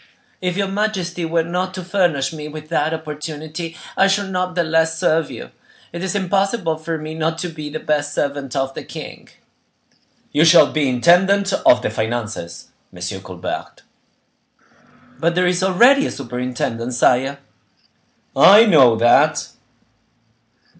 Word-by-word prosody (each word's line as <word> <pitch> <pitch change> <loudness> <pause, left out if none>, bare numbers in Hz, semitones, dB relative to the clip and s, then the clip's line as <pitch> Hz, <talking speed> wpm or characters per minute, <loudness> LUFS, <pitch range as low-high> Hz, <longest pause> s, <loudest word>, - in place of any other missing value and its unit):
"If 180 0 -2
your 200 -1 0
majesty 190 -4 -2
were 165 0 0
not 180 +2 -3
to 185 - -6
furnish 175 -7 0
me 150 -1 -7
with 155 0 -10
that 160 -2 0
opportunity, 155 +1 -6 0.2
I 195 - +4
should 195 0 0
not 180 -1 -2
the 175 - +1
less 160 0 +1
serve 160 0 +1
you. - - -9 0.4
It 170 +1 -5
is 190 0 -3
impossible 195 -2 0
for 160 +1 -4
me 155 0 -7
not 160 0 -2
to 180 +1 -4
be 155 -2 -7
the 155 +1 -5
best 145 -1 -1
servant 140 -2 -3
of 135 0 -1
the - - -7
king." - - -10 1.0
"You 150 - +3
shall 170 +1 +6
be 150 -3 0
intendant 190 +9 +3
of 125 - +3
the - - -1
finances, 110 -7 -5 0.2
M. 95 +2 -6
Colbert." 95 -2 -7 1.4
"But 170 +2 0
there 180 0 +2
is 180 +1 +1
already 240 +10 +4
a - - -5
superintendent, 125 -1 -4
sire." 130 +3 +2 1.0
"I 210 +4 +8
know 135 - +5
that." 120 +1 +3
160 Hz, 145 wpm, -19 LUFS, 140-180 Hz, 1.4 s, I